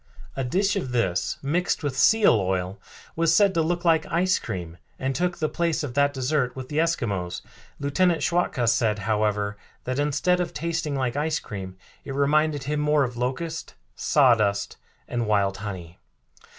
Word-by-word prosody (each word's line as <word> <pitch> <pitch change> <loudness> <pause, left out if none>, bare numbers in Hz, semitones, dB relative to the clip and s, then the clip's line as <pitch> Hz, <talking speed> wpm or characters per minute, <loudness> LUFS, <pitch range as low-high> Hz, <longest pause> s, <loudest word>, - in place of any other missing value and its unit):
A 135 - -2
dish 195 +11 +1
of 130 -11 -3
this, 95 -8 0
mixed 170 +4 0
with 140 -3 -2
seal 215 - +5
oil, 95 -1 -1 0.3
was 165 0 +3
said 200 +1 +5
to 165 - +2
look 175 +2 -1
like 160 -2 +3
ice 185 +2 +2
cream 85 -2 -6 0.2
and 135 +1 -2
took 180 +3 -1
the 155 - 0
place 165 0 -1
of 135 -4 -4
that 140 +1 +3
dessert 130 -1 -1
with 130 -1 -7
the 150 - -1
Eskimos. 100 - -1 0.4
Lieutenant 165 +4 +1
Schwatka 160 -8 +1
said, 110 -2 +2
however, 105 -1 0 0.3
that 130 +2 -2
instead 150 +5 +1
of 175 -2 -3
tasting 165 -3 -2
like 130 -2 -1
ice 155 +2 0
cream 95 -3 -7 0.3
it 135 - -6
reminded 145 +1 +2
him 150 +2 -2
more 150 -1 +3
of 125 -2 -3
locust, 145 +7 -3 0.2
sawdust 110 -8 +2 0.3
and 120 -2 -2
wild 100 -2 +1
honey. 95 -5 -7
140 Hz, 165 wpm, -25 LUFS, 110-165 Hz, 0.4 s, seal